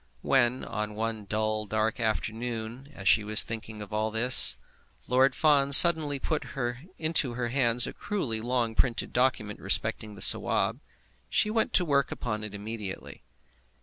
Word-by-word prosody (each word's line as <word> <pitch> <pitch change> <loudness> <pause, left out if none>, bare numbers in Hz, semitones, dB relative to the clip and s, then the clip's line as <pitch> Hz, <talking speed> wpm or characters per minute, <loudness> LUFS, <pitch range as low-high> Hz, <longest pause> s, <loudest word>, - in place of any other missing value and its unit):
When, 130 -1 0
on 105 -1 -6
one 110 -1 -5
dull, 110 +1 -3
dark 110 +2 -2
afternoon, 115 +3 -5
as 100 - -7
she 110 - +3
was 105 0 +3
thinking 110 -1 -8
of 105 - -13
all 110 +1 -2
this, 110 - +4 0.5
Lord 130 +2 +1
Fawn 145 -3 +1
suddenly 155 -2 +8
put 150 +3 -4 0.5
into 155 -6 -2
her 120 -1 -3
hands 120 -2 +3
a - - -7
cruelly 130 - -5
long 120 -1 -2
printed 115 +1 -2
document 120 -5 -2
respecting 105 -1 -1
the 95 - -13
Sawab, - - +3 0.5
she 210 - 0
went 225 0 -1
to 180 - +2
work 140 -3 -1
upon 110 -3 -6
it 105 -1 -9
immediately. 105 -1 -8
115 Hz, 150 wpm, -26 LUFS, 110-130 Hz, 0.5 s, suddenly